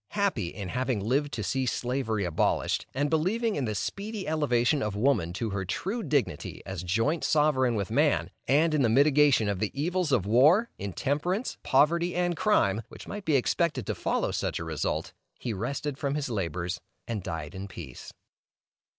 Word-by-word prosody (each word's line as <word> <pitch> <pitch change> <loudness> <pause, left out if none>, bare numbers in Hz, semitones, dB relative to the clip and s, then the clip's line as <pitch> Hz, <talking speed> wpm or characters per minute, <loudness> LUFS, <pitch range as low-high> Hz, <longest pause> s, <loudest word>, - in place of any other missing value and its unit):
Happy 195 - 0
in 95 +2 -6
having 130 -1 -1
lived 135 +8 0
to 110 - -3
see 130 +8 -1
Slavery 120 -5 -1
abolished, 85 -3 0
and 145 +3 0
believing 200 +9 +1
in 140 - -1
the 105 -2 -2
speedy 205 - -4
elevation 145 -2 +2
of 105 -4 -2
woman 105 -7 +2
to 110 +3 -3
her 100 -1 -2
true 195 - -3
dignity 145 - -1
as 95 -3 -5
joint 115 - 0
sovereign 140 -5 +3
with 100 -1 -2
man, 145 +4 +2 0.2
and 155 +4 +3
in 150 - +2
the 120 - +3
mitigation 140 -2 +4
of 100 -2 -1
the 110 - 0
evils 175 +1 0
of 115 -8 +2
war, 150 - +5
intemperance, 145 - -2
poverty, 170 +6 +3
and 175 -1 +1
crime, 115 - +2
which - - -11
might 205 -1 -6
be 155 - +2
expected 135 - +1
to - - -1
follow - - -1
such - - -2
a - - -4
result, 80 -3 -2 0.2
he 120 - -3
rested 135 +7 -3
from 140 -1 -1
his 145 -3 -2
labors, 90 -4 -3 0.3
and 115 -3 -3
died 80 -4 -5
in 95 +1 -6
peace. 80 -10 -9
130 Hz, 175 wpm, -28 LUFS, 100-155 Hz, 0.3 s, war